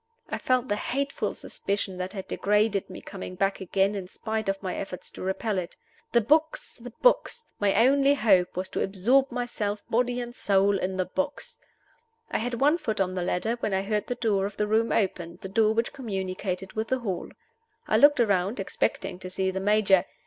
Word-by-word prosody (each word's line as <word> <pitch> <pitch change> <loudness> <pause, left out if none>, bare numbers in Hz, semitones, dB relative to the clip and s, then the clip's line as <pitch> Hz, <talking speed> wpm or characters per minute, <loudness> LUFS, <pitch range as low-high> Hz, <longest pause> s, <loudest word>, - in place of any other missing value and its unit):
I - - -2
felt 255 -1 +1
the 205 - 0
hateful 275 +5 -2
suspicion 195 -2 -3
that 185 +2 -4
had 190 -2 -6
degraded 210 -1 +1
me - - -8
coming 185 -2 -8
back 195 +1 0
again 195 +2 +1
in 195 -3 -5
spite 220 +2 -3
of 195 0 -2
my 185 -1 -2
efforts 185 -2 -6
to - - -10
repel 190 +2 -1
it. 175 - -6 0.4
The 235 - +4
books! 310 +7 +1
the 245 0 -9
books! - - +3
my 200 -1 +2
only 275 +5 +5
hope 190 -10 +3
was 185 +1 -1
to - - -2
absorb 240 +9 +2
myself, 220 -4 -3
body 245 +1 +1
and 240 0 -6
soul, 200 -2 +3
in 185 +1 -2
the 185 - +1
books. 285 +9 -4 0.7
I - - 0
had 240 +2 -2
one 290 +7 +3
foot 220 -9 -2
on 185 -1 +1
the 185 - -2
ladder, 200 +7 -1
when 210 -4 -1
I 190 - 0
heard 210 0 -1
the 245 - -2
door 205 -5 +1
of 205 - -11
the 210 - +1
room 220 +2 +2
open 175 -4 -1
the - - -4
door 215 +2 +3
which 230 +2 0
communicated 190 -5 -4
with 220 0 -2
the 260 +1 0
hall. 190 -6 -3 0.6
I - - +3
looked 290 -1 +6
around, 200 0 +2
expecting 180 - -2
to 185 0 -7
see 190 0 0
the 190 - -3
Major. 200 -2 +4
205 Hz, 200 wpm, -27 LUFS, 190-240 Hz, 0.7 s, looked